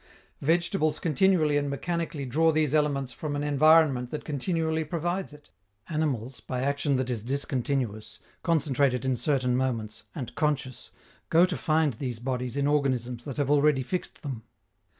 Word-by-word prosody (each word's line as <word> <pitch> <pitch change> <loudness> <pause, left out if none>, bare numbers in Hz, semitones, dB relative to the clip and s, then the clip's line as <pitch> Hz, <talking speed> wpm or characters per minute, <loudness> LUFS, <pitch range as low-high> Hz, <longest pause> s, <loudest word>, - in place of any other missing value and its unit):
Vegetables 165 0 +1
continually 160 -2 +3
and 145 -1 0
mechanically 165 0 -3
draw 160 +6 +3
these 155 -2 +1
elements 140 -4 +1
from 150 +1 -4
an 145 - -2
environment 150 -3 +4
that 150 - -6
continually 160 +2 -1
provides 175 +4 -2
it. 145 0 -16 0.4
Animals, 135 -6 -2
by 125 0 -4
action 140 0 +1
that 130 -1 -1
is 115 -3 -2
discontinuous, 120 -4 -2 0.2
concentrated 140 -5 +1
in 130 -1 +1
certain 130 -3 +1
moments, 115 -4 -2
and 125 -6 -5
conscious, 140 -5 -2 0.4
go 170 +2 +6
to 180 -2 -3
find 155 0 +1
these 125 0 -4
bodies 125 +1 -3
in 140 - +1
organisms 130 -5 0
that 140 -1 -6
have 145 -1 +1
already 145 -2 +4
fixed 180 +7 -5
them. 130 -6 -5
140 Hz, 150 wpm, -27 LUFS, 125-155 Hz, 0.4 s, go